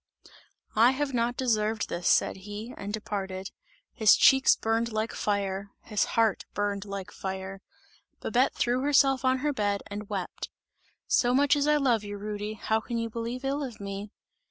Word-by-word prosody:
"I 235 +4 +6
have 275 0 -2
not 240 0 0
deserved 220 -3 0
this!" 170 0 -3
said - - +3
he, 205 +5 -7
and 200 +1 -6
departed. 195 -3 -4 0.4
His 220 -2 +6
cheeks 265 0 +6
burned 225 +1 0
like 215 +1 -2
fire, 200 -1 -2
his 210 -2 0
heart 225 -3 +3
burned 205 0 -1
like 200 0 -6
fire. 190 0 -6 0.6
Babette 250 +5 +1
threw 245 +1 +1
herself 270 -1 +3
on 260 0 +3
her 295 - +2
bed 205 -5 -1
and 205 0 -6
wept. 195 -4 -4 0.6
"So 245 0 +3
much 285 +2 +4
as 290 0 +1
I 300 0 +4
love 245 -7 +2
you, 205 0 -6
Rudy, 210 +1 -4
how 220 +1 0
can 235 +1 -4
you 230 0 -2
believe 235 +3 -4
ill 280 +2 -1
of 255 -6 -6
me!" 200 +1 -6
220 Hz, 170 wpm, -28 LUFS, 200-250 Hz, 0.6 s, I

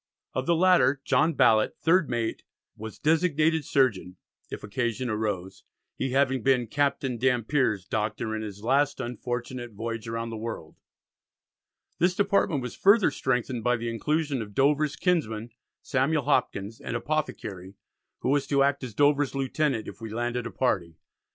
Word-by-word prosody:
Of 130 0 -2
the 170 - +4
latter, 160 -7 +4
John 160 +2 +2
Ballet, 110 -5 +4
third 170 0 +3
mate, 115 -2 -2 0.3
was 110 -1 -8
designated 160 0 +2
surgeon 105 -11 +1 0.3
if - - -7
occasion 120 +2 -2
arose, 105 -4 -3 0.3
he 135 - -2
having 135 -1 +2
been 125 -1 +2
"Captain 135 -1 -1
Dampier's 125 - +1
Doctor 110 +2 -2
in 110 - -3
his 105 -1 -8
last 140 +4 +2
unfortunate 120 0 -5
voyage 115 +1 -5
round 115 0 -3
the 115 - -5
world." 110 -8 -6 1.2
This 180 +1 +2
department 195 - +1
was 125 - -6
further 200 +1 +5
strengthened 125 -2 -1
by 125 0 +2
the 115 0 -3
inclusion 145 +3 -1
of 105 -2 -8
Dover's 145 +2 +2
kinsman, 120 - -1 0.3
Samuel 140 +2 +1
Hopkins, 100 -1 0
an - - -4
Apothecary, 110 -9 -3 0.5
who - - -1
was 140 0 +1
to 140 -1 +3
act 140 0 +1
as 120 -5 -7
Dover's 145 0 +2
lieutenant 135 -2 -1
"if - - -10
we 110 - -6
landed 120 +1 -2
a - - -8
party." 85 -10 -1
125 Hz, 150 wpm, -27 LUFS, 110-145 Hz, 1.2 s, further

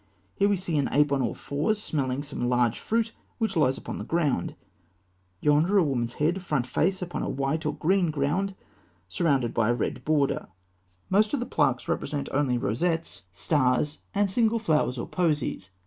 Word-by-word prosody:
Here 200 - +2
we 200 - +2
see 175 -4 -1
an 140 - 0
ape 150 0 +3
on 140 -1 +2
all - - -1
fours, 155 +10 -1
smelling 140 -7 -2
some 135 -4 -3
large 120 -2 +2
fruit 225 0 0 0.3
which 220 -4 -1
lies 135 -5 +3
upon - - -6
the - - -4
ground; 150 - 0 0.9
yonder, 155 +7 +3
a 190 - +6
woman's 120 -5 -1
head, 170 +6 0
front 150 -8 -1
face, 180 +9 0
upon 175 - -4
a - - -2
white 140 +4 -1
or 150 - -1
green 185 +1 +2
ground 155 +7 -1 0.5
surrounded 130 - +1
by 115 -1 +2
a 120 - +3
red 125 +1 -3
border. 145 -1 +1 0.6
Most 210 +5 +3
of - - -2
the 245 - -2
plaques - - +1
represent 145 -2 -2
only 135 -3 +1
rosettes, 130 - -1
stars, 145 - +1 0.2
and 200 -1 +2
single 230 +2 +2
flowers 155 - +1
or - - -4
posies. 150 - -1
150 Hz, 180 wpm, -27 LUFS, 130-185 Hz, 0.9 s, a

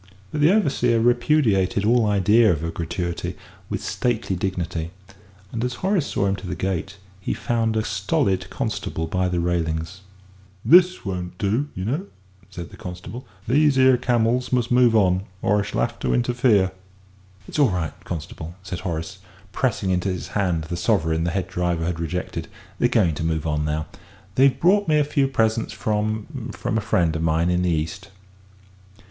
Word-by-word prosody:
But 150 - -2
the 155 +4 +6
overseer 130 - +2
repudiated 115 -5 +2
all 115 0 +4
idea 105 +2 +4
of 80 -2 -2
a 85 - -2
gratuity 85 +1 -3 0.3
with - - -3
stately 115 -6 -1
dignity, 90 -3 -3 0.6
and 115 0 -3
as 125 0 -2
Horace 190 -6 +2
saw 100 - 0
him 95 0 +1
to 95 - -8
the - - -3
gate, 95 +1 -3 0.2
he 95 - -2
found 115 -2 0
a 110 - +1
stolid 95 -2 0
constable 80 - -3
by 90 +3 0
the 90 -1 -1
railings. 85 +1 -2 0.6
"This 180 -2 +5
won't 90 -2 -4
do, 110 +9 0
you 95 - -4
know," 150 - -2 0.4
said 85 -2 -8
the - - -12
constable; 90 +8 -8 0.2
"these 145 +2 +3
'ere 130 0 +6
camels 120 0 +1
must 125 -2 +1
move 120 -2 +5
on 95 -3 +3 0.2
or 105 +1 +3
I - - 0
shall - - -2
'ave 120 - 0
to - - 0
interfere." 120 -5 +2 0.8
"It's - - -4
all 140 -4 +5
right, 90 -4 -2
constable," 80 0 -6
said 90 -2 -5
Horace, 80 -3 -4 0.3
pressing 95 - 0
into 90 +1 0
his 90 -1 -4
hand 90 -6 0
the 85 +2 -5
sovereign 80 -5 +1
the - - +1
head 90 0 -2
driver 90 -3 -1
had 85 -1 -2
rejected; 85 -1 -3 0.3
"they're 120 - +3
going 105 -9 +3
to 75 - -4
move 80 -1 -1
on 75 -1 0
now. 75 +1 -1 0.5
They've 135 +4 +4
brought 200 +3 +4
me 155 -1 +4
a 150 - +4
few 140 -1 +1
presents 115 -4 0
from 110 +5 -2
from 110 - -1
a - - -3
friend 85 -6 +1
of 80 - -2
mine 80 +2 +2
in 90 0 +1
the 90 - +1
East." 85 +4 -2
100 Hz, 175 wpm, -23 LUFS, 85-120 Hz, 0.8 s, the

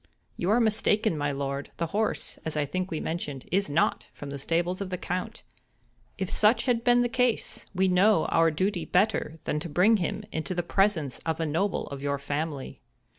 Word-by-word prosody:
"You 175 - -2
are 220 +4 +4
mistaken, 215 -3 +2
my 145 -1 -1
lord; 140 0 -3
the 170 - 0
horse, 215 +1 -1
as 160 -1 -4
I 150 - +1
think 185 +6 -3
we 160 -4 -3
mentioned, 150 -5 -4
is 195 +1 +1
not 150 +4 +1
from 145 -1 -8
the 140 - -5
stables 175 +6 -1
of 195 - -3
the 180 - -3
Count. 180 +1 -4 0.7
If 190 -2 -2
such 220 +2 +3
had 240 -3 +1
been 245 0 +5
the - - +2
case, 250 -1 0
we 190 +1 +3
know 185 0 +4
our 165 0 +3
duty 180 +3 -1
better 180 -4 +1
than 150 - -1
to 170 +2 -6
bring 190 +9 +4
him 200 +3 -2
into 160 +3 -3
the 175 - 0
presence 170 -7 +1
of 160 -1 -3
a 165 - 0
noble 170 +6 0
of 140 -1 -7
your 140 0 -1
family." 145 0 -4
175 Hz, 200 wpm, -27 LUFS, 150-205 Hz, 0.7 s, been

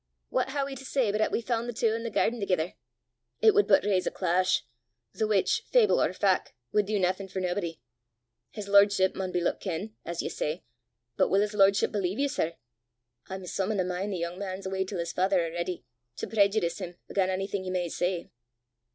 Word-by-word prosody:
What - - 0
hae 280 +1 -1
we 275 0 -4
to - - -10
say 260 -5 +1
but 210 +1 0
'at - - +2
we 235 - -1
faund 235 0 -1
the 240 - -3
twa 225 -1 +1
i' 230 - -3
the 230 - -3
gairden 230 +2 +1
thegither! 180 -3 0 0.7
It 435 - +6
wud 415 0 +4
but - - +5
raise 190 -3 +1
a - - +3
clash 185 -4 +1 0.5
the 220 - 0
which, 205 -3 +2
fable 485 -4 +4
or - - +2
fac', 190 0 +1 0.2
wud 210 -2 +2
do 210 0 0
naething 185 +1 0
for 190 0 -4
naebody! 175 -2 -2 0.7
His 210 -2 -7
lordship 200 -1 +5
maun 185 -1 -3
be 175 - 0
loot - - 0
ken, 195 +3 -4
as 170 0 -4
ye - - -2
say; 155 +4 -3 0.5
but - - +3
wull 195 +2 +4
his 210 +1 -1
lordship 195 -1 +4
believe 195 -1 -1
ye, 285 - +2
sir? 170 - -2 0.7
I'm 190 -1 -6
some 190 +3 -1
i' - - -1
the 190 - +1
min' 180 +3 -2
the 195 - -2
yoong 170 +1 -4
man 195 -1 -5
's - - -11
awa' 190 0 -1
til 190 -1 -5
's 170 - -4
faither 185 -1 +2
a'ready, 170 0 -4 0.3
to - - -4
preejudice 200 -4 +2
him 175 -2 -7
again' 190 -2 +1
onything 195 +1 -2
ye 185 - -4
may 180 -1 -1
say." 175 +1 -2
195 Hz, 220 wpm, -28 LUFS, 180-210 Hz, 0.7 s, It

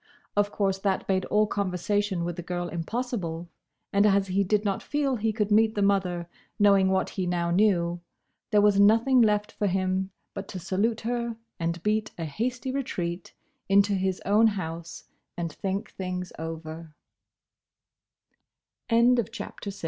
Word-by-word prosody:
Of 205 0 +2
course 195 -2 0
that 195 -1 -1
made 190 -1 +1
all 210 0 +3
conversation 200 -1 -1
with 175 -1 -3
the 175 - -5
girl 175 0 -3
impossible, 175 -2 -4 0.4
and 200 0 +4
as 195 -1 +2
he 195 +2 +2
did 210 +2 +1
not 195 -1 0
feel 285 -3 0
he 220 +1 0
could 210 -1 -1
meet 220 +1 +4
the 205 - +1
mother, 185 -4 +1 0.3
knowing 200 -2 +5
what 190 0 +1
he 185 -2 -2
now 170 -1 0
knew, 175 -3 +2 0.5
there 210 -2 +4
was 205 -1 +4
nothing 230 +5 +5
left 210 -1 +2
for 205 - -1
him 190 0 0 0.2
but 195 -1 -6
to 185 - -6
salute 215 +6 0
her 235 0 -2 0.2
and 170 0 -2
beat 215 0 +1
a 165 - -3
hasty 245 - -3
retreat 180 -10 -4 0.3
into 200 +1 +4
his 190 -1 0
own 210 +3 +5
house 170 -5 -4 0.3
and 170 -3 -3
think 195 +3 -3
thing 185 -1 -4
195 Hz, 145 wpm, -27 LUFS, 180-210 Hz, 0.5 s, knowing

